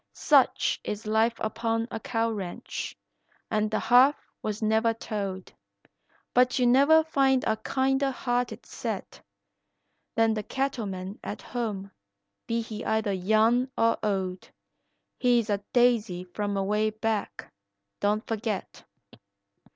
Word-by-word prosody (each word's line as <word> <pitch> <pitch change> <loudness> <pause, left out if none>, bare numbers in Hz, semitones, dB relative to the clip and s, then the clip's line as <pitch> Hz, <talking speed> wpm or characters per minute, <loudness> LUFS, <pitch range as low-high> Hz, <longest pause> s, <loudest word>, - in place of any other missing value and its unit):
Such - - +3
is 210 +1 -5
life 220 +2 +2
upon 225 +1 -1
a - - -4
cow 230 0 -1
ranch, 205 +2 -5 0.5
and 215 -1 +1
the 215 - 0
half 255 +4 +6 0.3
was 215 -1 -3
never 220 +1 +2
told; 200 -4 -5 0.8
But 250 +1 +4
you 250 - +3
never 280 +6 +6
find 270 -4 +2
a 220 - +1
kinder 270 +4 +1
hearted 245 -1 -2
set - - -6 0.9
Than 225 -1 +3
the 215 - -2
cattleman 205 -7 -3
at - - -6
home, 210 -6 -4 0.6
be 230 0 0
he 220 -1 -7
either 220 -2 0
young 220 +7 +2
or 230 0 +2
old, 190 -3 -2 0.7
He's 240 -3 +2
a 200 - +1
"daisy 230 -7 +2
from 200 +3 -3
away 210 +2 +1
back," 215 -1 -3 0.5
don't 210 +2 0
forget. 220 -3 -4
220 Hz, 120 wpm, -27 LUFS, 210-245 Hz, 0.9 s, half